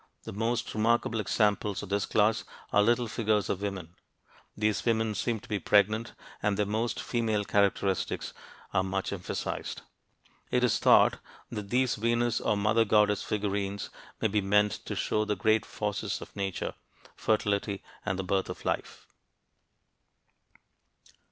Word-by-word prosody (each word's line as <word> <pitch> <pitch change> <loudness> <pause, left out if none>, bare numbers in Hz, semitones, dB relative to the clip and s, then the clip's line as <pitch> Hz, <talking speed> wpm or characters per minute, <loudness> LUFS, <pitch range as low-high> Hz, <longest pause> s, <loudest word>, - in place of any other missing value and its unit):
The - - -7
most 115 +3 -1
remarkable 115 +1 +1
examples 105 -1 +1
of 105 - -8
this 100 0 0
class 105 +1 +2 0.3
are 105 - +6
little 120 +3 +2
figures 110 -2 0
of 95 - -1
women. 95 -4 -4 0.6
These 105 -1 +1
women 110 -2 +1
seem 115 +2 -1
to - - -14
be 105 -4 -1
pregnant, 105 +3 +2 0.3
and 100 -1 +1
their 105 - +2
most 110 +3 -1
female 110 -4 0
characteristics 100 -2 0 0.4
are 95 - +3
much 95 +1 -2
emphasized. 90 -3 -4 0.7
It 125 0 +1
is 125 - +3
thought - - +5 0.3
that 105 -1 -5
these 125 +1 +2
"Venus" 120 +1 +1
or 105 - +1
"Mother 105 +3 +3
goddess" 105 -1 +3
figurines 100 -1 -2 0.3
may 110 - +2
be 105 0 +1
meant 105 +1 +3 0.2
to - - -3
show 105 - 0
the 105 -1 -1
great 110 +2 +2
forces 105 -1 -3
of - - -11
nature 95 -2 -3 0.4
fertility 100 -2 0 0.2
and 95 - -1
the 95 - -2
birth 95 +1 0
of - - -7
life. - - -3
105 Hz, 145 wpm, -29 LUFS, 100-110 Hz, 0.7 s, are